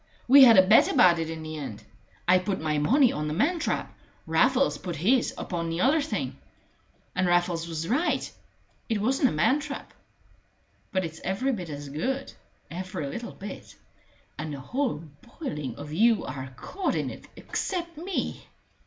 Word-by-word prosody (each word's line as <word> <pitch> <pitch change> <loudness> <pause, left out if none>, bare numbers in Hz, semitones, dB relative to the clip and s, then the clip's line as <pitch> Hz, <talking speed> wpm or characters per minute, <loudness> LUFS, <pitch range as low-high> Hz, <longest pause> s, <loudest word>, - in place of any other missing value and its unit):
We 275 +2 +9
had 230 -4 +7
a 185 - +8
bet 215 +4 +6
about 175 -2 +5
it 165 -1 -2
in 160 -1 -6
the 155 0 -6
end. 135 -8 -7 0.4
I 180 +1 +6
put 185 +1 -2
my 155 -1 0
money 250 - +4
on 150 0 -3
the 150 - -2
man 335 - +1
trap. 325 - -2 0.3
Raffles 255 +12 +2
put 180 -2 -5
his 235 - +2
upon 170 -2 -3
the 165 +2 -2
other 295 +5 +4
thing. 295 - -3 0.8
And 180 0 +1
Raffles 175 -1 +1
was 165 -1 -4
right 295 - 0 0.6
it 220 -2 0
wasn't 260 +4 +2
a - - -4
man 170 - +2
trap. 285 -2 -7 1.0
But 185 -2 0
it's 160 0 -8
every 195 +9 0
bit 185 -9 -4
as 145 -1 -6
good 260 - -3 0.4
every 185 -2 -5
little 235 +12 -6
bit 195 0 -9 0.6
and 155 0 -4
the 140 - -5
whole 240 - -2 0.4
boiling 150 - -4
of 145 +2 -8
you 225 +5 +3
are 130 0 -6
caught 385 - -2
in - - -1
it - - -11
except 345 -3 -3
me!" 350 +4 -4
185 Hz, 170 wpm, -27 LUFS, 160-265 Hz, 1.0 s, We